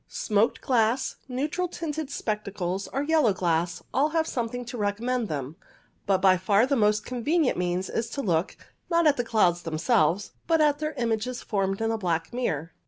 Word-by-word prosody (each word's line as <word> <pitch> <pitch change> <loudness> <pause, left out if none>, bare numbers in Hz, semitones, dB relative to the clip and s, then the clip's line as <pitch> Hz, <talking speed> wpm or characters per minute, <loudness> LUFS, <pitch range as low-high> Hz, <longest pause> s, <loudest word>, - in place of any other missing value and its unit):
Smoked 215 +1 0
glass, 240 0 +1
neutral 295 +8 -2
tinted 315 -4 -4
spectacles, 200 -5 -3
or 275 - -2
yellow 295 -8 +3
glass 170 -1 -1
all 290 +3 +3
have 320 0 +1
something 245 -3 -3
to 245 +2 -7
recommend 230 +3 -1
them; 145 0 -5 0.5
but 195 -1 +4
by 185 -1 +6
far 200 +5 +3
the 280 +1 +1
most 210 -2 +2
convenient 275 +5 +1
means 180 +1 -1
is 230 0 -2
to 275 +3 -4
look, 170 -2 0 0.3
not 335 -1 +3
at 295 -2 +5
the 245 - 0
clouds 180 -7 +2
themselves, 170 +2 +1 0.2
but 325 -1 +3
at 295 -1 +3
their 305 0 -2
images 235 0 -2
formed 195 -1 -1
in 225 0 +1
a 225 - -2
black 170 -2 -1
mirror. 165 - -2
225 Hz, 175 wpm, -26 LUFS, 190-270 Hz, 0.5 s, by